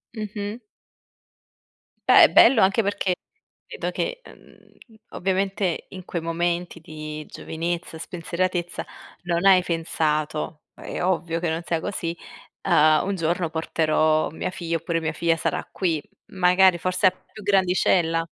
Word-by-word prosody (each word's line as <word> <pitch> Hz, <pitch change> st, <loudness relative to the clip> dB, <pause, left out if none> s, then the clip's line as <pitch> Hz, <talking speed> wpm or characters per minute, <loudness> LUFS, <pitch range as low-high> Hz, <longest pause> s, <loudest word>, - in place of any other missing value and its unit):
Mh-mh. 210 Hz, +1 st, -5 dB, 1.5 s
Beh, -, -, +9 dB
è -, -, +7 dB
bello 235 Hz, -1 st, +7 dB
anche 195 Hz, +4 st, +4 dB
perché 200 Hz, -2 st, 0 dB, 0.5 s
credo -, -, -4 dB
che, -, -, -3 dB
uhm, 225 Hz, -, -19 dB, 0.2 s
ovviamente 190 Hz, -1 st, -1 dB
in 185 Hz, -1 st, -9 dB
quei 175 Hz, -1 st, -4 dB
momenti 170 Hz, +1 st, -2 dB
di 155 Hz, -1 st, -7 dB
giovinezza, 170 Hz, +1 st, -4 dB
spensieratezza 175 Hz, +1 st, -3 dB, 0.4 s
non 175 Hz, +1 st, -1 dB
hai 190 Hz, -2 st, +6 dB
pensato- 155 Hz, -2 st, -2 dB
è -, -, -6 dB
ovvio 170 Hz, -2 st, 0 dB
che 170 Hz, -1 st, -1 dB
non 160 Hz, +1 st, -2 dB
sia 170 Hz, -1 st, -1 dB
così- 170 Hz, -2 st, -4 dB, 0.4 s
ehm: 155 Hz, -4 st, +4 dB
"Un 200 Hz, -, -1 dB
giorno 170 Hz, 0 st, -1 dB
porterò 155 Hz, -1 st, +1 dB
mia 160 Hz, -, -4 dB
figlia", 170 Hz, -3 st, -3 dB
oppure: 165 Hz, +1 st, -2 dB
"Mia 160 Hz, -1 st, -2 dB
figlia 165 Hz, +1 st, +1 dB
sarà -, -, -2 dB
qui"; 165 Hz, -5 st, -1 dB, 0.3 s
magari 185 Hz, 0 st, +4 dB
forse 185 Hz, +1 st, 0 dB
a -, -, +4 dB
più 210 Hz, +3 st, -15 dB
grandicella? 180 Hz, -4 st, +2 dB
175 Hz, 135 wpm, -24 LUFS, 165-190 Hz, 1.5 s, Beh